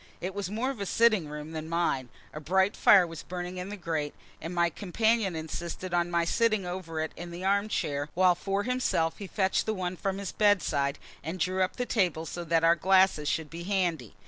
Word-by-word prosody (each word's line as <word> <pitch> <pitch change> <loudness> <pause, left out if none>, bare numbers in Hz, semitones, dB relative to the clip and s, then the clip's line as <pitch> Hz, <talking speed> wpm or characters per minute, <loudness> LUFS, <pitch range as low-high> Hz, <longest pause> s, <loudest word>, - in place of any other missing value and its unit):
It 185 +2 -4
was 200 -2 -3
more 230 +6 -1
of 260 - -9
a 200 - -3
sitting 215 -8 +3
room 150 +1 -7
than 160 0 -5
mine; 165 -7 0 0.2
a 150 - -5
bright 190 +6 +2
fire 195 -3 +6
was 165 -2 -8
burning 180 0 -6
in 180 +2 -5
the 210 - -6
grate, 160 -5 -3 0.3
and 165 - -5
my 170 -1 +2
companion 210 +1 +1
insisted 170 +3 -5
on 175 0 +1
my 170 -1 +1
sitting 215 0 +1
over 175 -3 -5
it 160 - -3
in 175 0 -7
the 170 +2 -7
arm 200 +2 +2
chair, 145 -8 -2
while 185 0 +5
for 195 +3 -2
himself 245 -10 0
he 200 - -6
fetched 190 -1 0
the 220 - 0
one 185 -1 -3
from 195 +1 -2
his 200 -2 -4
bedside, 155 -9 +2 0.3
and 165 +5 -5
drew 185 +3 0
up 185 - 0
the 245 - -2
table 180 -9 0
so 175 +2 -5
that 165 0 +1
our 165 +1 +6
glasses 185 -3 +3
should 160 -1 -2
be 170 +1 -7
handy. 175 - -1
180 Hz, 220 wpm, -28 LUFS, 165-195 Hz, 0.3 s, fire